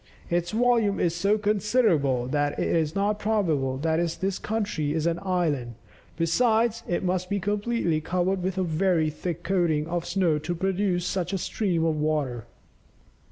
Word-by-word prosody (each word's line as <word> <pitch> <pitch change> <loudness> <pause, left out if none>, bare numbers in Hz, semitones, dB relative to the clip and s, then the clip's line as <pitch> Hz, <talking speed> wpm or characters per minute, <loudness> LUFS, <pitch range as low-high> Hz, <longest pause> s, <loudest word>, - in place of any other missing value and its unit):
"Its 175 0 0
volume 230 -2 +2
is 170 - +1
so 200 +5 +2
considerable 205 - +2
that 145 +2 -1
it - - 0
is 160 -1 0
not 205 +1 0
probable 165 -12 0
that 165 +3 0
this 190 0 -1
country 205 -9 -2
is 160 0 -1
an 170 0 0
island, 155 - -1 0.4
besides, 225 +7 +2
it 175 - -1
must 180 0 -1
be 200 - 0
completely 205 -4 0
covered 185 +3 0
with 190 +1 -2
a 190 - +1
very 165 -1 +1
thick 175 +2 -5
coating 170 -6 +1
of 170 +1 -2
snow 175 -4 +1
to 165 +4 -3
produce 190 0 0
such 185 0 -2
a - - +1
stream 175 -3 -1
of 160 -1 +1
water." 150 -6 -1
175 Hz, 160 wpm, -26 LUFS, 155-200 Hz, 0.4 s, volume